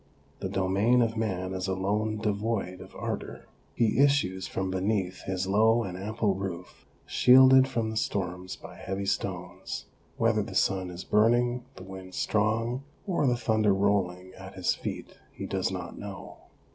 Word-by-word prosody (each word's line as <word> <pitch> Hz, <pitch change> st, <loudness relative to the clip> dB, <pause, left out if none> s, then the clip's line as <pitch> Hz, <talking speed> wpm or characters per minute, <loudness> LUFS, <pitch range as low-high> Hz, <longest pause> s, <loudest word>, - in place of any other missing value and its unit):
The -, -, -3 dB
domain 100 Hz, +6 st, +3 dB
of 115 Hz, 0 st, -1 dB
man 95 Hz, -4 st, -2 dB
is 95 Hz, 0 st, -3 dB
alone 105 Hz, +3 st, 0 dB
devoid 105 Hz, -3 st, -2 dB
of -, -, -12 dB
ardour. -, -, -5 dB, 0.3 s
He 115 Hz, 0 st, +2 dB
issues 140 Hz, -10 st, +3 dB
from 95 Hz, 0 st, -2 dB
beneath 95 Hz, -1 st, -1 dB
his 95 Hz, 0 st, -1 dB
low 110 Hz, +4 st, +4 dB
and 90 Hz, -4 st, -5 dB
ample 105 Hz, +2 st, -1 dB
roof, 95 Hz, -3 st, -6 dB, 0.2 s
shielded 130 Hz, +1 st, +7 dB
from 115 Hz, -4 st, -1 dB
the -, -, -5 dB
storms 90 Hz, -3 st, -2 dB
by -, -, -12 dB
heavy 95 Hz, +1 st, -4 dB
stones; -, -, -3 dB, 0.3 s
whether -, -, +2 dB
the -, -, -6 dB
sun 95 Hz, -2 st, +1 dB
is 90 Hz, 0 st, -7 dB
burning, 120 Hz, +3 st, +2 dB
the 95 Hz, -, -10 dB
wind 95 Hz, -1 st, -9 dB
strong, 115 Hz, +4 st, 0 dB, 0.2 s
or 175 Hz, -8 st, +1 dB
the 120 Hz, -1 st, +2 dB
thunder 110 Hz, -3 st, +2 dB
rolling 95 Hz, -2 st, 0 dB
at 95 Hz, 0 st, -11 dB
his 90 Hz, -2 st, +1 dB
feet, -, -, -6 dB
he -, -, -7 dB
does 95 Hz, -1 st, -1 dB
not 90 Hz, -2 st, -6 dB
know. 100 Hz, -1 st, -8 dB
100 Hz, 160 wpm, -28 LUFS, 95-115 Hz, 0.3 s, shielded